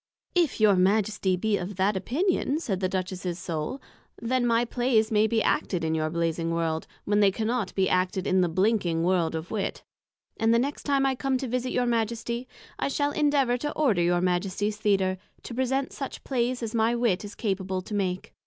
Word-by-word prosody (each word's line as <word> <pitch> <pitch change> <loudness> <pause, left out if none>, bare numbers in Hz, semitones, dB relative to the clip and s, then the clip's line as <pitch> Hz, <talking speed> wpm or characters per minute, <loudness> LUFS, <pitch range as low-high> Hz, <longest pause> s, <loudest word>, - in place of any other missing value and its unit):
If 345 -9 +1
your 210 -2 +5
Majesty 195 0 +2
be 210 +2 +1
of 185 +3 -5
that 195 +3 +1
Opinion, 295 - 0
said 200 - -2
the 185 -1 0
Duchess's 185 -1 -3
Soul, 170 - -4 0.4
then 245 +1 0
my 235 0 +3
Playes 235 -2 +1
may 215 0 +4
be 225 -1 +1
acted 175 -4 0
in 160 0 0
your 155 -1 0
Blazing 165 0 -1
World, 165 -1 -1 0.2
when 205 0 +2
they 200 -1 +6
cannot 220 +1 -2
be 190 -1 +2
acted 185 0 0
in 185 0 +3
the 175 - +2
Blinking 185 -2 +1
World 175 -2 +1
of 160 +2 -5
Wit; 210 -3 -3 0.5
and 225 0 +2
the 230 - +5
next 275 +5 -2
time 275 -1 +3
I 270 - +2
come 265 0 0
to 260 - -4
visit 255 +1 -2
your 250 - +1
Majesty, 235 +1 -1 0.3
I - - 0
shall 285 +1 0
endeavour 285 -5 +2
to 295 +4 -3
order 235 - +2
your 175 0 +2
Majesty's 190 +3 0
Theatre, 195 -3 +1 0.2
to - - -7
present 260 +2 -1
such 275 - -6
Playes 250 -1 -1
as 225 0 -4
my 230 +1 +2
Wit 230 -6 +1
is 205 +1 -8
capable 190 -3 -2
to 210 - -8
make. 185 -3 -2
210 Hz, 200 wpm, -27 LUFS, 185-245 Hz, 0.5 s, they